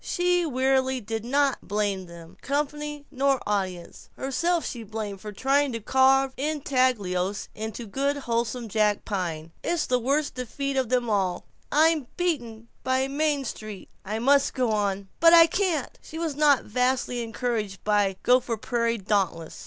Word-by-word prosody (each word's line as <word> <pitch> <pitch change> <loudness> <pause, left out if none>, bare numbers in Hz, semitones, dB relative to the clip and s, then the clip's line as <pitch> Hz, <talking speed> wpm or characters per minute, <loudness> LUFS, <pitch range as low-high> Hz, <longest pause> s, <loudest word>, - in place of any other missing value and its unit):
She 355 -1 +1
wearily 265 -1 +1
did 225 -1 -4
not 275 +2 +1
blame 200 -2 -1
them, 170 -1 -12
company 295 +1 -3
nor 275 -1 +2
audience. 190 -4 -3
Herself 335 +6 0
she 240 - -5
blamed 215 -2 -6
for 210 - -7
trying 275 +6 +1
to 230 - -3
carve 265 +3 +3
intaglios 255 -10 0
in 220 +1 -4
good 265 +6 -2
wholesome 235 -2 -2
jack 210 -1 +1
pine. 165 -6 -3
"It's 340 -3 0
the 250 0 +1
worst 280 +5 0
defeat 270 +3 -4
of 260 -3 0 0.2
all. 195 -4 0 0.3
I'm 310 -2 +3
beaten. 240 -11 -2 0.2
By 260 +1 +1
Main 285 0 0
Street. 215 -4 -7
'I 210 +2 -3
must 275 +4 +3
go 250 -4 +1
on.' 200 -2 -1
But 330 0 +7
I 335 -1 +9
can't!" 340 -5 -1
She 320 - -9
was 325 -3 -2
not 290 -3 +4
vastly 250 +1 0
encouraged 225 -3 -3
by 205 -2 +2
the - - -25
Gopher 245 -2 +3
Prairie 235 +1 0
Dauntless 190 -5 -1
250 Hz, 155 wpm, -26 LUFS, 210-280 Hz, 0.3 s, I